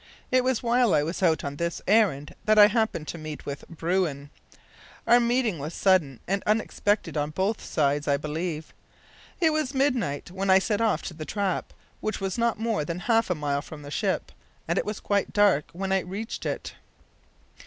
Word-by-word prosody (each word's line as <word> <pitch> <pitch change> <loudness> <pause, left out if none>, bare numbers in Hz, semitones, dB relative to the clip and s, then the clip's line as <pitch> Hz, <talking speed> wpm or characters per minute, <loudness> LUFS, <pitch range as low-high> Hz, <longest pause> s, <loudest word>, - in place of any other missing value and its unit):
It 255 0 +4
was 255 -2 0
while 240 -1 +3
I 145 - +3
was 165 +6 -4
out 165 -4 +2
on 140 0 -4
this 170 +1 -2
errand 190 -9 +3
that 215 0 +4
I 210 - +10
happened 215 -8 0
to 170 - -5
meet 155 -1 -7
with 140 0 -5
bruin. 165 -4 -1 0.7
Our 240 +1 +6
meeting 235 - +1
was 150 +4 -5
sudden 170 - +2
and 195 +2 0
unexpected 210 -2 0
on 145 0 0
both 190 +7 -1
sides, 145 -1 0
I 140 -1 +3
believe. 155 +2 -4 0.7
It 325 -3 +3
was 305 -3 -1
midnight 245 - 0
when 190 +1 -2
I 190 - +8
set 210 +3 0
off 225 -2 +1
to 175 - -5
the 155 -1 -7
trap, 195 +2 -2 0.3
which 215 - -3
was 195 +2 -3
not 235 -1 +1
more 225 -6 -1
than 170 +3 -4
half 225 +1 +2
a 180 - +1
mile 145 -2 -1
from 150 0 -10
the 145 - -9
ship, 195 +3 -1 0.4
and - - +1
it - - -2
was 210 0 -3
quite 200 -1 -1
dark 200 -8 +3
when 190 +2 -4
I 190 - +4
reached 195 +5 -5
it. - - -4
190 Hz, 195 wpm, -26 LUFS, 155-220 Hz, 0.7 s, I